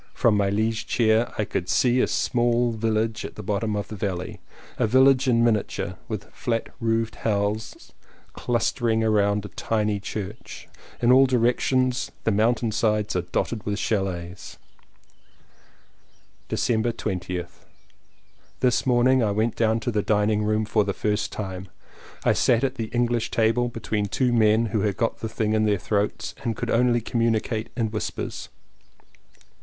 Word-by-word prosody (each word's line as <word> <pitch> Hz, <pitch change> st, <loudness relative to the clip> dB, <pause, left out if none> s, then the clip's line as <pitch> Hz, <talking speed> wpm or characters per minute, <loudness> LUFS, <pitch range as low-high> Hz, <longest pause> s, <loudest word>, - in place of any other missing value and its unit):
From 115 Hz, -3 st, +3 dB
my 100 Hz, -1 st, +2 dB
liege 110 Hz, +2 st, -1 dB
chair 115 Hz, 0 st, +2 dB
I 105 Hz, -, 0 dB
could 90 Hz, -2 st, -3 dB
see 125 Hz, 0 st, +3 dB
a -, -, +2 dB
small 120 Hz, -1 st, +1 dB
village 110 Hz, 0 st, -1 dB
at -, -, -7 dB
the 105 Hz, -, -8 dB
bottom 105 Hz, +2 st, -1 dB
of 105 Hz, -, -3 dB
the 110 Hz, -, -6 dB
valley, 95 Hz, -3 st, -4 dB, 0.4 s
a -, -, +3 dB
village 130 Hz, +3 st, +4 dB
in 115 Hz, -2 st, +3 dB
miniature, 110 Hz, -3 st, 0 dB
with -, -, -4 dB
flat 115 Hz, -1 st, -2 dB
roofed 115 Hz, -1 st, -1 dB
houses 105 Hz, 0 st, -2 dB, 0.4 s
clustering 120 Hz, -1 st, 0 dB
round 105 Hz, -1 st, +2 dB
a -, -, -7 dB
tiny 105 Hz, -2 st, -1 dB
church. 105 Hz, +1 st, -7 dB, 0.4 s
In 120 Hz, -, +5 dB
all 135 Hz, +1 st, +7 dB
directions 125 Hz, +1 st, +1 dB
the 110 Hz, -, +2 dB
mountain 115 Hz, +2 st, +1 dB
sides 105 Hz, -1 st, 0 dB
are 90 Hz, -, +2 dB
dotted 100 Hz, +5 st, -3 dB
with 105 Hz, 0 st, -2 dB
chalets. 90 Hz, -4 st, -3 dB, 1.9 s
December 115 Hz, 0 st, +1 dB
20th. 90 Hz, -5 st, -5 dB, 0.9 s
This 125 Hz, 0 st, +1 dB
morning 130 Hz, +1 st, +4 dB
I 110 Hz, -, +2 dB
went 110 Hz, +3 st, 0 dB
down 110 Hz, 0 st, +2 dB
to 120 Hz, -, -1 dB
the 105 Hz, -2 st, +1 dB
dining 105 Hz, 0 st, +1 dB
room 110 Hz, +1 st, +1 dB
for 105 Hz, 0 st, +2 dB
the 100 Hz, -1 st, -2 dB
first 105 Hz, 0 st, -1 dB
time. 95 Hz, -2 st, -6 dB, 0.6 s
I -, -, +4 dB
sat 120 Hz, 0 st, +2 dB
at 130 Hz, -2 st, +1 dB
the 115 Hz, -4 st, -4 dB
English 120 Hz, 0 st, 0 dB
table 115 Hz, +2 st, +1 dB
between 110 Hz, -3 st, -2 dB
two 125 Hz, +4 st, 0 dB
men 110 Hz, 0 st, +4 dB
who 110 Hz, -, +1 dB
had 100 Hz, -1 st, -1 dB
got 115 Hz, -, -1 dB
the 110 Hz, -, -4 dB
thing 110 Hz, -1 st, -1 dB
in 110 Hz, 0 st, +2 dB
their 105 Hz, -1 st, +2 dB
throats 105 Hz, +2 st, -2 dB
and 115 Hz, -2 st, -1 dB
could -, -, -3 dB
only 120 Hz, 0 st, +3 dB
communicate 115 Hz, -1 st, -1 dB
in 115 Hz, -3 st, 0 dB
whispers. 110 Hz, -, -4 dB
110 Hz, 155 wpm, -24 LUFS, 105-120 Hz, 1.9 s, all